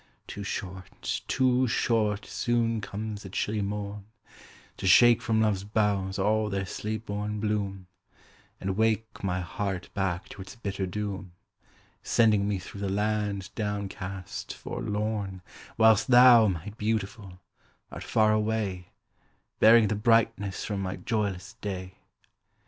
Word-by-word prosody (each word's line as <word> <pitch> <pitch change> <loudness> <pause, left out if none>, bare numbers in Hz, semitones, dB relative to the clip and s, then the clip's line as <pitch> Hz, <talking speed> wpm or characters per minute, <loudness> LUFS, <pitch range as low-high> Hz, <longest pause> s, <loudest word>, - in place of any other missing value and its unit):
Too 100 - -7
short 95 -1 -5
too 130 -1 +2
short 110 -3 +1
soon 115 -2 0
comes 105 +1 -5
the 95 - -9
chilly 105 +2 -1
morn, 100 0 -4 0.7
To - - -3
shake 120 +6 +7
from 110 -1 +1
love's 105 -3 +1
boughs 100 -2 0
all 105 +2 +1
their 100 -1 -2
sleep 110 +3 -4
born 105 +1 -3
bloom, 100 -3 -2 0.7
And 95 0 -2
wake 110 0 0
my 90 -1 -1
heart 95 +1 -4
back 95 -3 -2
to 100 - -9
its 95 - -10
bitter 100 -4 -3
doom, 100 -2 -5 0.7
Sending 105 -3 +3
me 105 -1 0
through 100 +2 -9
the 100 - -1
land 105 -1 -1
down 105 -2 -2
cast, 95 0 -6
forlorn, 105 -3 -3 0.3
Whilst 110 -1 +5
thou, 125 -3 +8
my 95 +2 -3
Beautiful, 105 -3 -3 0.5
art - - -7
far 110 -1 +3
away, 105 -4 -1 0.7
Bearing 115 0 +7
the 105 - 0
brightness 110 -2 +1
from 105 -2 -3
my 95 0 -3
joyless 105 -4 -2
day. 95 -2 -5
105 Hz, 130 wpm, -28 LUFS, 95-110 Hz, 0.7 s, thou